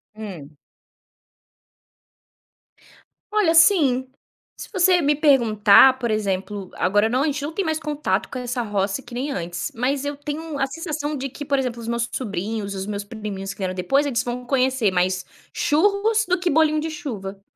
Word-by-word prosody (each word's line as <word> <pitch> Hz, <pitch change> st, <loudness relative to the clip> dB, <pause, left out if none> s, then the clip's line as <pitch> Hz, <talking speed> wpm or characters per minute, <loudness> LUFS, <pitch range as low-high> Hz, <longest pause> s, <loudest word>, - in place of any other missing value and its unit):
Hum. 170 Hz, -9 st, -9 dB, 2.8 s
Olha, 390 Hz, -6 st, +3 dB
sim. 290 Hz, -8 st, +4 dB, 0.5 s
Se -, -, -9 dB
você 365 Hz, -2 st, +4 dB
me 295 Hz, 0 st, +2 dB
perguntar, 255 Hz, -4 st, +5 dB
por 240 Hz, -3 st, -2 dB
exemplo, 195 Hz, -2 st, -2 dB
agora 205 Hz, +4 st, +2 dB
não 255 Hz, +4 st, +1 dB
a -, -, +1 dB
gente 295 Hz, -1 st, -1 dB
não 295 Hz, +3 st, -4 dB
tem 395 Hz, -, -1 dB
mais 315 Hz, -1 st, -1 dB
contato 295 Hz, -10 st, -1 dB
com -, -, -6 dB
essa 245 Hz, 0 st, -3 dB
roça 205 Hz, +1 st, -1 dB
que 245 Hz, -, -14 dB
nem 265 Hz, +4 st, -3 dB
antes. 175 Hz, -4 st, -4 dB
Mas 265 Hz, +4 st, -1 dB
eu 285 Hz, 0 st, -4 dB
tenho 295 Hz, +1 st, -5 dB
a 270 Hz, -, +1 dB
sensação 305 Hz, 0 st, -4 dB
de 275 Hz, +1 st, -4 dB
que, 290 Hz, +3 st, -8 dB
por 280 Hz, 0 st, +1 dB
exemplo, 250 Hz, -3 st, -2 dB
os 225 Hz, -, -8 dB
meus 235 Hz, 0 st, -1 dB
sobrinhos, 205 Hz, -2 st, -3 dB
os 190 Hz, 0 st, -4 dB
meus 205 Hz, -1 st, -4 dB
priminhos 205 Hz, -2 st, -6 dB
que -, -, -25 dB
vieram 185 Hz, -1 st, -2 dB
depois, 190 Hz, +11 st, +1 dB
eles 250 Hz, -5 st, 0 dB
vão 245 Hz, 0 st, -5 dB
conhecer 260 Hz, -4 st, +1 dB
mais 185 Hz, 0 st, 0 dB, 0.3 s
churros 410 Hz, +7 st, +2 dB
do 365 Hz, 0 st, +2 dB
que 355 Hz, 0 st, -1 dB
bolinho 310 Hz, 0 st, +3 dB
de 320 Hz, -, -3 dB
chuva. 210 Hz, -, -6 dB
255 Hz, 175 wpm, -22 LUFS, 205-295 Hz, 2.8 s, perguntar